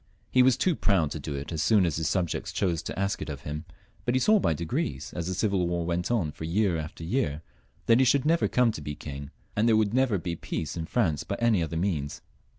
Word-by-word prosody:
He 130 - +5
was 130 0 +5
too 180 -3 +2
proud 90 - +2
to 80 - -4
do 70 0 -5
it 70 +3 -5
as 80 -2 -2
soon 105 +1 +4
as 80 -4 -1
his 80 -2 0
subjects 90 -4 -1
chose 85 -5 0
to 85 - -6
ask 100 +1 -1
it - - -5
of 70 -3 -5
him, 75 +2 -5 0.4
but 120 - 0
he - - +4
saw 215 +10 +5
by 80 - +1
degrees, 75 -4 -3
as 85 -1 -3
the 95 - -2
civil 95 -3 +1
war 85 -1 -1
went 90 +1 -1
on 105 -11 +1
for 80 - -10
year 90 +3 +1
after 80 +1 -7
year, 80 - -1 0.4
that 115 +1 +5
he 130 - +5
should 140 +2 +3
never 165 +2 +3
come 125 -2 +3
to 80 - -7
be 75 0 -5
king, 70 -1 -7 0.3
and 105 +3 +2
there 110 - +5
would 110 -1 +1
never 130 -5 +3
be 85 -1 -3
peace 80 -2 -4
in 80 -1 -4
France, 85 - +1
by - - -3
any 115 -6 +3
other 80 0 -2
means. 80 -6 -2
85 Hz, 255 wpm, -27 LUFS, 80-110 Hz, 0.4 s, He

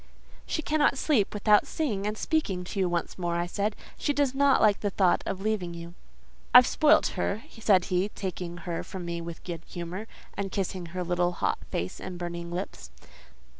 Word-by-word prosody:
"She 315 - -2
cannot 295 -2 +2
sleep 260 -9 +2
without 210 0 +4
seeing 210 -11 -1
and 210 +1 -2
speaking 205 - 0
to 190 +2 -5
you 185 -2 +2
once 175 +1 -2
more," 175 -1 -1
I 170 0 0
said. 205 +4 -1 0.2
"She 290 - +1
does 280 -2 +1
not 275 0 +4
like 210 -2 +4
the 205 - 0
thought 185 -2 +3
of 190 - -3
leaving 195 -5 -1
you." 170 0 -8 0.6
"I've - - +11
spoilt - - +4
her," 90 - -2 0.2
said 195 -5 +4
he, 185 +2 +1
taking 180 -3 -5
her 170 -2 -2
from 185 -2 -7
me 170 0 -3
with 165 -1 -8
good 170 -3 -5
humour, 180 +5 -6 0.3
and 195 -1 -3
kissing 185 -2 -3
her 180 +2 -4
little 175 0 +1
hot - - 0
face 90 +2 -3
and 185 -1 -6
burning 170 -1 -5
lips. 175 - -5
185 Hz, 190 wpm, -28 LUFS, 175-210 Hz, 0.6 s, I've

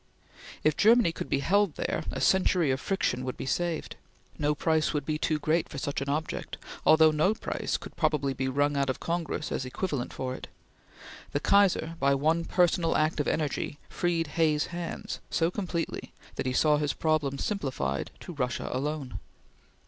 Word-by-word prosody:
If 155 -1 +3
Germany 225 -3 +5
could - - -6
be 140 - +1
held 200 +1 +2
there, - - -2
a - - -4
century 180 -5 +3
of 130 - -1
friction 130 -10 0
would 130 0 -4
be - - -5
saved. 170 +3 -2 0.4
No 150 0 +1
price 160 0 +1
would 145 -2 -1
be 155 0 -1
too 155 - +1
great 155 +2 0
for 140 - -7
such 140 0 -2
an 140 - -3
object; 155 +2 -3 0.3
although 160 0 +7
no 155 +8 +2
price - - -2
could - - -11
probably 140 -3 +1
be 130 +1 -2
wrung 145 +2 +1
out 140 -1 +1
of 130 - -1
Congress 170 -1 -2
as - - -1
equivalent 130 0 -3
for 130 -1 -3
it. - - -8 0.9
The 145 - +1
Kaiser, 175 -3 +3
by 140 0 +3
one 160 +4 +1
personal 175 -2 +2
act 155 0 +1
of 145 - 0
energy, 150 -1 -1
freed 170 -2 0
Hay's 150 -1 +1
hands 170 -1 -5
so 165 +1 +1
completely 180 -4 -3 0.2
that - - -3
he 130 - 0
saw 150 +3 +4
his 145 -2 0
problems 145 -3 0
simplified 130 - -2
to 175 - -7
Russia 125 -5 -2
alone. 135 -5 -3
155 Hz, 180 wpm, -28 LUFS, 140-170 Hz, 0.9 s, although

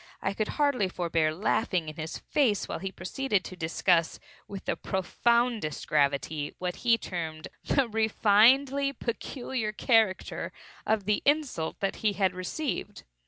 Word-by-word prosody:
I 195 - -1
could 215 +1 -1
hardly 280 -10 +2
forbear 165 -3 0
laughing 180 0 0
in 155 - -6
his 160 0 -5
face 235 -9 +1
while - - -4
he 195 0 -4
proceeded 200 +3 -1
to 185 - -8
discuss, 165 0 +1 0.3
with 195 -1 -8
the - - 0
profoundest 235 -1 0
gravity, 145 +1 0
what 180 -1 -3
he 235 -1 +3
termed 160 -6 -5
"the 275 -3 +2
refinedly 235 +6 +4
peculiar 240 -1 -3
character" 215 -3 +1 0.4
of 215 -3 +1
the 210 0 +1
insult 285 - +1 0.2
he 215 -2 0
had 190 -1 +1
received. 185 - -4
205 Hz, 135 wpm, -28 LUFS, 175-240 Hz, 0.4 s, refinedly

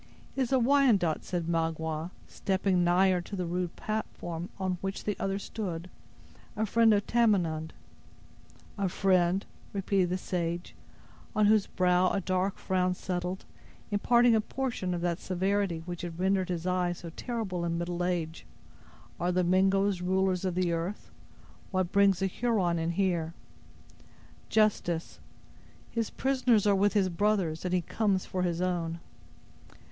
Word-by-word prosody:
"It 270 - 0
is 255 - 0
a 265 - +5
Wyandot," 235 - +3
said 175 -2 -3
Magua, 160 -1 -1 0.2
stepping 190 -2 0
nigher 180 +1 +3
to 200 - -7
the 180 -2 -2
rude 175 0 -2
platform 175 -5 -4
on 185 -2 -2
which 195 0 -4
the 210 - -1
other 195 0 -1
stood; 180 -4 -5 0.6
"a 220 +1 0
friend 225 +1 +4
of 205 -1 +2
Tamenund." 175 -9 +1 1.1
"A 195 -2 +1
friend!" 185 0 +2 0.3
repeated 195 -2 +1
the 180 - 0
sage, 175 -1 -3 0.6
on 215 - +4
whose 210 -1 +4
brow 180 0 +3
a - - 0
dark 185 +1 -1
frown 185 -1 0
settled, 180 +1 -4 0.5
imparting 240 +3 +4
a 220 - +4
portion 225 -7 -3
of 170 - -4
that 175 -1 -1
severity 185 -2 -1
which 175 -1 -5
had 170 -2 -6
rendered 190 0 +1
his 175 -1 -3
eye 180 -1 +1
so 170 -1 -9
terrible 205 -4 -3
in 170 0 -1
middle 175 +1 -2
age. 170 -3 -2 0.7
"Are 175 +1 +1
the 180 0 +2
Mingoes 190 +1 +2
rulers 185 0 +1
of 185 -2 -1
the 180 -1 +1
earth? 170 +5 -4 0.6
What 185 -2 -1
brings 195 -2 +4
a - - +3
Huron 190 -4 0
in 165 0 -1
here?" 170 -3 0 1.1
"Justice. 195 -6 +1 0.7
His 230 -2 -1
prisoners 255 -5 +2
are 205 - +5
with 200 +1 +3
his 195 -3 +2
brothers, 185 -3 0
and 180 - -1
he 180 -1 +2
comes 195 +1 0
for 185 - -3
his 175 -1 -1
own." 170 -2 -1
185 Hz, 150 wpm, -29 LUFS, 175-200 Hz, 1.1 s, a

